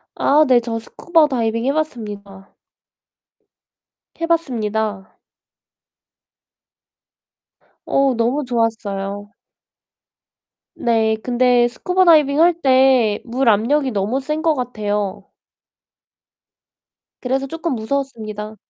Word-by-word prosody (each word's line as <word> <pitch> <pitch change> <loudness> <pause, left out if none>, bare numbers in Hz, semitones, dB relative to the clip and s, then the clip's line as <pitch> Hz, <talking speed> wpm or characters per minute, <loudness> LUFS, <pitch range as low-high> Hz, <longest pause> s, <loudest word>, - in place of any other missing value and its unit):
아 300 +2 +3
네 250 -2 +4
저 230 -1 -4
스쿠버 320 +7 +1
다이빙 230 -3 -2
해 275 - +2
봤습니다. 205 -10 -6 1.7
해 330 - -2
봤습니다. 220 - -2 2.7
어 275 -1 +2
너무 245 +6 0
좋았어요. 205 -4 -3 1.4
네 225 -2 +1
근데 245 -1 +3
스쿠버 365 +9 0
다이빙할 325 +2 +4
때 260 -5 +3
물 250 +2 -2
압력이 260 +6 +1
너무 210 +6 -1
센 305 +3 -3
것 325 -1 +2
같아요. 210 -5 -3 2.0
그래서 265 +2 -2
쪼끔 325 0 -3
무서웠습니다. 220 -3 -4
245 Hz, 190 characters per minute, -19 LUFS, 220-280 Hz, 2.7 s, 네